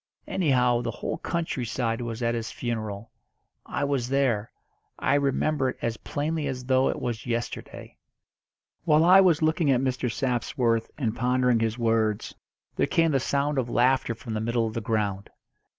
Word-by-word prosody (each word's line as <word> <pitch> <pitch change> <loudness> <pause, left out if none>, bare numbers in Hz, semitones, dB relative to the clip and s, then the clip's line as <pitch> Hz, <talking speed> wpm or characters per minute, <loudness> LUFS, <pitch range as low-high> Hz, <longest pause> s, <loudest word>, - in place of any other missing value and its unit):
Anyhow, 125 -8 +2
the 120 - -3
whole 115 - -4
country 165 -7 -2
side 115 0 -2
was 120 0 -4
at 115 0 +1
his 115 -1 -3
funeral. 110 -2 -4 0.6
I - - -2
was 140 -4 -1
there. 130 -6 +1 0.5
I 130 - +1
remember 140 0 +1
it - - -6
as 115 -1 -2
plainly 150 +1 -2
as 130 -2 -4
though 130 +1 +3
it - - -2
was 120 -1 -4
yesterday." 120 0 -5 0.9
While 155 -1 +4
I 185 +2 +8
was 170 -5 +3
looking 155 -1 +2
at 130 -3 +4
Mr. 125 -2 -1
Sapsworth, 120 -2 0
and 120 -6 -1
pondering 125 -1 +2
his 110 0 -1
words, 115 -3 0 0.4
there - - +2
came 165 -1 +2
the 135 - +2
sound 140 +2 0
of 120 -2 -2
laughter 125 -1 +2
from 115 -1 -7
the 110 - -2
middle 115 +1 0
of 110 - -4
the 115 - -3
ground. 105 -3 -2
125 Hz, 170 wpm, -26 LUFS, 115-140 Hz, 0.9 s, I